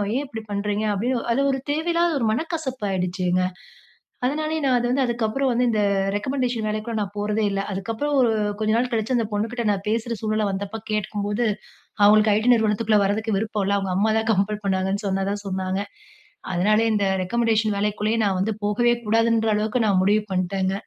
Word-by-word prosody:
ஏன் 275 Hz, -, 0 dB
இப்டி 225 Hz, -5 st, -7 dB
பண்றீங்க?" 205 Hz, +1 st, -1 dB
அப்டின்னு 240 Hz, +4 st, -1 dB
அது 275 Hz, -, +1 dB
ஒரு 270 Hz, -, -1 dB
தேவையில்லாத 335 Hz, +1 st, +1 dB
ஒரு 235 Hz, -, 0 dB
மனக்கசப்பாயிடுச்சுங்க. 195 Hz, -, -1 dB, 0.8 s
அதனாலேயே 310 Hz, +4 st, -1 dB
நான் 255 Hz, -2 st, +3 dB
அது 240 Hz, -, -1 dB
வந்து 270 Hz, +1 st, +2 dB
அதுக்கப்புறம் 240 Hz, +3 st, 0 dB
வந்து 245 Hz, +1 st, +2 dB
இந்த 215 Hz, -2 st, +1 dB, 0.3 s
ரெக்கமெண்டேஷன் 245 Hz, 0 st, -1 dB
வேலைக்குள்ள 215 Hz, +1 st, -3 dB
நான் 200 Hz, 0 st, -5 dB
போறதே 210 Hz, +1 st, 0 dB
இல்ல. 195 Hz, 0 st, -1 dB
அதுக்கப்புறம் 225 Hz, +9 st, -3 dB
ஒரு 245 Hz, -3 st, +4 dB, 0.3 s
கொஞ்ச 215 Hz, 0 st, +1 dB
நாள் 245 Hz, +1 st, 0 dB
கழிச்சு 225 Hz, +3 st, 0 dB
அந்த 230 Hz, -, 0 dB
பொண்ணுகிட்ட 230 Hz, +3 st, -2 dB
நான் 200 Hz, 0 st, -3 dB
பேசுற 230 Hz, +1 st, -1 dB
சூழ்நிலை 215 Hz, -1 st, 0 dB
வந்தப்ப 200 Hz, +3 st, -4 dB
கேட்கும்போது, 210 Hz, +1 st, -1 dB, 0.6 s
அவுங்களுக்கு 215 Hz, +1 st, +6 dB
ஐ-டி 220 Hz, +4 st, +1 dB
நிறுவனத்துக்குள்ள 215 Hz, -1 st, +2 dB
வரதுக்கு 215 Hz, +1 st, 0 dB
விருப்பம் 215 Hz, -1 st, -2 dB
இல்ல. 200 Hz, +1 st, +1 dB
அவுங்க 195 Hz, -2 st, -2 dB
அம்மா 215 Hz, +2 st, +2 dB
தான் 220 Hz, +1 st, -2 dB
கம்பல் 210 Hz, +1 st, 0 dB
பண்ணாங்கன்னு 190 Hz, +1 st, -1 dB
சொன்னதா, 195 Hz, +1 st, -1 dB
சொன்னாங்க. 190 Hz, 0 st, -2 dB, 0.7 s
அதனால 205 Hz, +5 st, +3 dB
இந்த 205 Hz, -1 st, +1 dB, 0.2 s
ரெகமெண்டஷன் 220 Hz, 0 st, +1 dB
வேலைக்குள்ளயே 210 Hz, +2 st, 0 dB
நான் 195 Hz, -2 st, +1 dB
வந்து 220 Hz, +3 st, 0 dB
போகவே 240 Hz, +4 st, +2 dB
கூடாதுன்ற 225 Hz, +1 st, +2 dB
அளவுக்கு 220 Hz, +3 st, 0 dB
நான் 190 Hz, -2 st, +3 dB
முடிவு 210 Hz, +2 st, +3 dB
பண்ட்டேங்க. 190 Hz, +1 st, 0 dB
215 Hz, 165 wpm, -23 LUFS, 200-235 Hz, 0.8 s, அவுங்களுக்கு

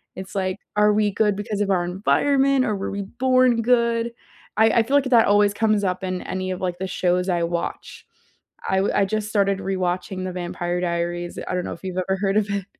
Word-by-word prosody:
It's 190 Hz, +1 st, -9 dB
like, 185 Hz, 0 st, -1 dB, 0.2 s
are 210 Hz, 0 st, +4 dB
we 210 Hz, 0 st, +2 dB
good 210 Hz, 0 st, +1 dB
because 205 Hz, 0 st, -3 dB
of 200 Hz, -1 st, +1 dB
our 180 Hz, -2 st, +2 dB
environment 270 Hz, +9 st, +2 dB
or 215 Hz, -4 st, 0 dB
were 195 Hz, -, -4 dB
we 200 Hz, 0 st, -3 dB
born 250 Hz, +2 st, +2 dB
good? 235 Hz, -1 st, +2 dB, 0.4 s
I 220 Hz, -, +5 dB
I 230 Hz, +1 st, +3 dB
feel 270 Hz, +5 st, 0 dB
like 280 Hz, -, +1 dB
that 240 Hz, -3 st, +5 dB
always 205 Hz, 0 st, +4 dB
comes 215 Hz, -2 st, +1 dB
up 185 Hz, 0 st, -1 dB
in 185 Hz, -1 st, -3 dB
any 185 Hz, 0 st, -4 dB
of, 185 Hz, -, -5 dB
like, 180 Hz, -2 st, -2 dB
the 190 Hz, -, -3 dB
shows 180 Hz, 0 st, 0 dB
I 175 Hz, -1 st, +1 dB
watch. 170 Hz, 0 st, -4 dB, 0.6 s
I 190 Hz, -, +2 dB
w 195 Hz, +1 st, +1 dB
I 200 Hz, -, +3 dB
just 210 Hz, +1 st, -2 dB
started 200 Hz, -2 st, +1 dB
rewatching 185 Hz, 0 st, -2 dB
the 185 Hz, -, -3 dB
Vampire 175 Hz, 0 st, -3 dB
Diaries. 175 Hz, 0 st, -3 dB
I -, -, -2 dB
don't 180 Hz, -, -2 dB
know -, -, -4 dB
if 170 Hz, -, -13 dB
you've 185 Hz, -1 st, -5 dB
ever 190 Hz, +1 st, -1 dB
heard 195 Hz, 0 st, +1 dB
of 210 Hz, -1 st, +2 dB
it. 200 Hz, -2 st, -2 dB
195 Hz, 225 wpm, -22 LUFS, 185-215 Hz, 0.6 s, I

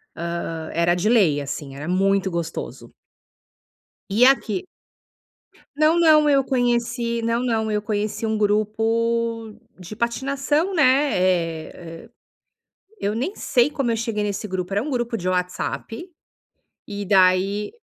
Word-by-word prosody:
Hã, 165 Hz, -1 st, -4 dB
era 170 Hz, +1 st, +2 dB
de 185 Hz, +5 st, 0 dB
lei, 175 Hz, -12 st, +3 dB
assim, 140 Hz, 0 st, -6 dB
era 150 Hz, +4 st, -7 dB
muito 195 Hz, 0 st, +1 dB
gostoso. 170 Hz, -1 st, -5 dB, 1.2 s
E 240 Hz, +5 st, +5 dB
aqui 245 Hz, -, +1 dB, 1.1 s
Não, 310 Hz, +3 st, +3 dB
não, 305 Hz, -3 st, +5 dB
eu 275 Hz, -1 st, +4 dB
conheci 235 Hz, -2 st, 0 dB
não, 230 Hz, +1 st, 0 dB
não, 220 Hz, -2 st, 0 dB
eu 210 Hz, 0 st, 0 dB
conheci 215 Hz, +1 st, -2 dB
um 220 Hz, 0 st, 0 dB
grupo 225 Hz, +2 st, 0 dB, 0.2 s
de 185 Hz, +3 st, -9 dB
patinação, 275 Hz, -, -1 dB
né. 285 Hz, -1 st, +3 dB
Eh, 165 Hz, -2 st, -2 dB, 0.9 s
eu 205 Hz, +2 st, -1 dB
nem 275 Hz, -, -2 dB
sei 245 Hz, +3 st, +2 dB
como 275 Hz, -5 st, -1 dB
eu 225 Hz, -, 0 dB
cheguei 225 Hz, -2 st, -2 dB
nesse 205 Hz, 0 st, -3 dB
grupo. 185 Hz, -1 st, -4 dB
Era 205 Hz, +3 st, +1 dB
um 300 Hz, -, -5 dB
grupo 240 Hz, -2 st, -2 dB
de 185 Hz, -3 st, -3 dB
WhatsApp 185 Hz, -, -3 dB, 0.8 s
e 205 Hz, -1 st, -5 dB
daí 195 Hz, -, +2 dB
215 Hz, 130 wpm, -22 LUFS, 185-240 Hz, 1.2 s, E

